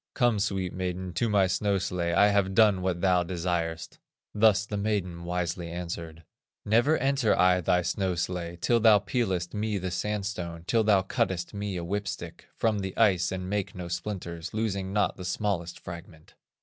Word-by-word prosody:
"Come, 120 -4 +2
sweet 95 -2 -1
maiden, 90 -1 -4
to 115 +3 0
my 100 -2 +4
snow 100 +2 +1
sledge, 85 -2 -1
I 105 - +6
have 100 -2 +1
done 105 -4 +5
what 90 -2 -1
thou 90 -2 +3
desirest." 85 -2 -3 0.3
Thus 105 -1 +4
the 105 - -5
maiden 100 -5 -2
wisely 85 -1 -2
answered: 85 -2 -6 0.4
"Never 120 +9 +3
enter 135 -4 +2
I 90 0 +4
thy 90 +1 +2
snow 95 +1 -1
sledge, 85 0 -4
Till 120 -1 +3
thou 110 -2 +7
peelest 95 -4 -1
me 105 0 -1
the 95 -1 -3
sandstone, 95 -4 -3
Till 115 +3 +2
thou 100 -3 +4
cuttest 95 -2 -1
me 100 -2 -3
a 85 - -4
whip 100 +4 -2
stick - - -7
From 110 -2 +1
the 95 -1 -5
ice, 95 -6 +3
and 90 -1 -4
make 105 +1 -2
no 90 -1 -6
splinters, 85 -1 -5
Losing 100 -4 -1
not 105 +1 +1
the 90 - -7
smallest 90 -2 -2
fragment." 85 -2 -11
95 Hz, 175 wpm, -28 LUFS, 85-105 Hz, 0.4 s, thou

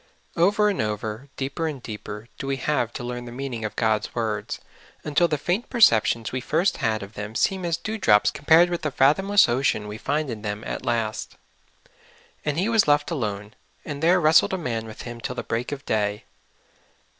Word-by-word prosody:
OVER 205 +5 +3
and 200 - -1
over, 110 +4 -4
deeper 140 +4 -2
and 150 -4 -4
deeper, 105 0 -7
do 135 - -4
we 135 - 0
have 130 -3 0
to - - -6
learn 120 0 -5
the 120 - -8
meaning 125 -2 -5
of 110 - -4
God's 110 -2 0
words, 110 -3 -2 0.4
until 150 +3 +2
the 150 - -1
faint 180 - -2
perceptions 115 - +4
we 130 - -3
first 165 +9 +1
had 110 -2 0
of 100 +2 -10
them 105 +1 -6
seem 190 +7 +1
as 170 -2 0
dew 220 0 -5
drops 105 - +4
compared 165 +4 +4
with 175 - -2
the 155 - -1
fathomless 190 +10 +4
ocean 120 -4 0
we 105 +1 -7
find 145 +1 -1
in 110 -2 -6
them 105 0 -4
at - - -4
the - - -11
last. 110 -2 -2 0.5
" - - -30
And 150 0 -1
he 185 +5 +1
was 225 -5 +3
left 145 +2 +3
alone, 105 -7 -3 0.3
and 145 -1 -5
there 175 +3 +4
wrestled 160 +3 +5
a - - +1
man 115 -9 -3
with 110 - -9
him 120 -1 -8
till 125 - -4
the - - -4
break 120 +4 -3
of 145 0 -6
day. 105 -1 -1
130 Hz, 205 wpm, -24 LUFS, 110-160 Hz, 0.5 s, wrestled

